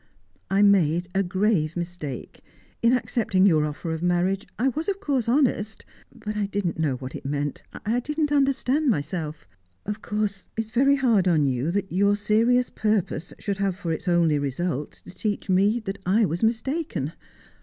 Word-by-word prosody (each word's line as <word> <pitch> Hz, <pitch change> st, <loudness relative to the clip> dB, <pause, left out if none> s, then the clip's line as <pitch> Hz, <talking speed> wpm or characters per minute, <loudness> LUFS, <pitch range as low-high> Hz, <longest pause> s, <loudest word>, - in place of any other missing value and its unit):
I 195 Hz, +1 st, +3 dB
made 180 Hz, -3 st, +3 dB
a 195 Hz, -, +2 dB
grave 185 Hz, -4 st, +1 dB
mistake. 170 Hz, -6 st, -6 dB, 0.4 s
In 235 Hz, -, +4 dB
accepting 200 Hz, -6 st, +1 dB
your 155 Hz, -6 st, +4 dB
offer 150 Hz, +3 st, -5 dB
of 160 Hz, 0 st, -3 dB
marriage, 180 Hz, +3 st, +1 dB
I 255 Hz, +4 st, +2 dB
was 310 Hz, +8 st, -3 dB
of 395 Hz, 0 st, -2 dB
course 270 Hz, -, 0 dB
honest, 235 Hz, -5 st, +1 dB, 0.3 s
but 210 Hz, 0 st, -6 dB
I 205 Hz, -1 st, 0 dB
didn't 195 Hz, -5 st, -2 dB
know 150 Hz, -5 st, +1 dB
what 130 Hz, +1 st, -7 dB
it -, -, -7 dB
meant; 145 Hz, 0 st, -2 dB, 0.2 s
I 230 Hz, +4 st, +1 dB
didn't 300 Hz, +3 st, -1 dB
understand 275 Hz, +1 st, +2 dB
myself. 155 Hz, -, -2 dB, 0.4 s
Of 210 Hz, +1 st, -4 dB
course 210 Hz, -2 st, -2 dB
it's 220 Hz, -1 st, -3 dB
very 275 Hz, +4 st, +4 dB
hard 230 Hz, -9 st, +3 dB
on 160 Hz, -5 st, +3 dB
you 130 Hz, +2 st, 0 dB
that 195 Hz, +2 st, -2 dB
your 200 Hz, +3 st, +3 dB
serious 230 Hz, +4 st, +2 dB
purpose 205 Hz, -6 st, -1 dB
should 200 Hz, -2 st, -3 dB
have 195 Hz, -2 st, 0 dB
for 180 Hz, -3 st, -4 dB
its 160 Hz, -, -4 dB
only 170 Hz, -4 st, +3 dB
result 145 Hz, +2 st, -2 dB
to -, -, -10 dB
teach 205 Hz, 0 st, -2 dB
me 200 Hz, +5 st, +3 dB
that 195 Hz, -2 st, -5 dB
I 210 Hz, +5 st, +3 dB
was 170 Hz, -1 st, -2 dB
mistaken. 230 Hz, -, -1 dB
200 Hz, 175 wpm, -25 LUFS, 170-225 Hz, 0.4 s, In